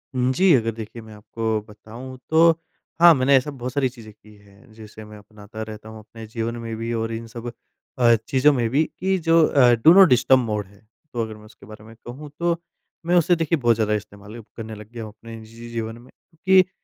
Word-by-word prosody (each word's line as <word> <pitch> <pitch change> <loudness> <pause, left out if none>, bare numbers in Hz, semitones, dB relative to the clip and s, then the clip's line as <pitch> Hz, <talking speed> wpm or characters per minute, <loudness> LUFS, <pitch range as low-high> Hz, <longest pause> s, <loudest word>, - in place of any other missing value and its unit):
उम, 125 +1 +1
जी। 185 +4 +4
अगर 115 -2 0
देखिए 115 +1 -8
मैं 110 -1 -13
आपको 110 +1 -3
बताऊँ 115 +5 -11
तो 165 +1 +5 0.5
हाँ, 170 -1 +9
मैंने 135 +1 +3
ऐसा 145 +3 -2
बहुत 125 -2 -7
सारी 135 -3 +1
चीज़ें 115 -4 -14
की 105 0 -20
है 100 +4 -21
जिसे 110 0 -12
मैं 105 0 -12
अपनाता 105 +1 -12
रहता 110 0 -10
हूँ 110 0 -10
अपने 110 +1 -12
जीवन 115 +1 -4
में 115 -1 -6
भी 115 +1 -4
और 115 0 -2
इन 115 0 -6
सब 115 +1 -8 0.5
अ, 120 -1 +5
चीज़ों 140 +2 +3
में 120 -3 -1
भी 140 +6 +2 0.2
कि 190 +1 0
जो 165 0 +5
अ, 125 -4 +4
डू 120 +9 +6
नॉट 190 -1 +8
डिस्टर्ब 130 +1 +4
मोड 105 -4 -3
है। 100 +1 -22 0.3
तो 120 - -2
अगर 110 -1 -7
मैं 105 0 -16
उसके 110 -2 -17
बारे 110 0 -13
में 115 +1 -14
कहूँ 140 +5 -9
तो 170 0 0 0.5
मैं 175 +1 +1
उसे 175 0 +4
देखिए 165 0 0
बहुत 120 -3 +2
ज़्यादा 105 -1 0
इस्तेमाल 105 +1 -7
अब 115 - -12
करने 110 -1 -7
लग 105 0 -12
गया 115 -2 -7
हूँ 110 - -9
अपने 115 +1 -12
जी 115 - -17
जी 120 0 -10
जीवन 115 -1 -5
में। 120 +2 -17
क्योंकि 185 +3 +1
115 Hz, 230 wpm, -22 LUFS, 110-130 Hz, 0.5 s, हाँ